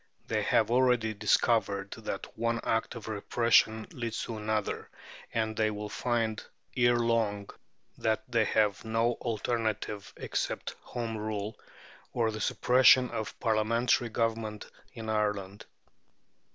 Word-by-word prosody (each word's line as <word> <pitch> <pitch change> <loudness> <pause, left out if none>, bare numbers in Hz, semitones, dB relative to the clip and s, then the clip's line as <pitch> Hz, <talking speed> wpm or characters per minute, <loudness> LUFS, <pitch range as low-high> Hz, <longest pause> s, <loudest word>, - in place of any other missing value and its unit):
They - - 0
have - - +2
already 120 -3 +3
discovered 105 -1 +1
that - - -6
one 115 +1 0
act 115 +2 0
of 115 - -8
repression 110 +1 +2
leads 115 -2 -4
to 115 - -5
another, 110 -1 -2 0.4
and 110 -1 -1
they 110 0 +2
will 105 0 -5
find 115 -2 -1 0.3
ere 120 -1 +4
long 115 -4 0 0.5
that 110 -1 0
they 115 -3 +2
have 105 -2 +1
no 115 +1 +1
alternative 110 -3 -2
except - - -3
Home 115 -2 -4
Rule 105 0 -3 0.6
or 115 -2 +1
the 110 0 -5
suppression 125 0 +5
of 110 - -5
Parliamentary 115 +2 +2
Government 110 -1 -2 0.3
in 115 -3 -8
Ireland. 105 -2 -2
110 Hz, 125 wpm, -30 LUFS, 105-115 Hz, 0.6 s, suppression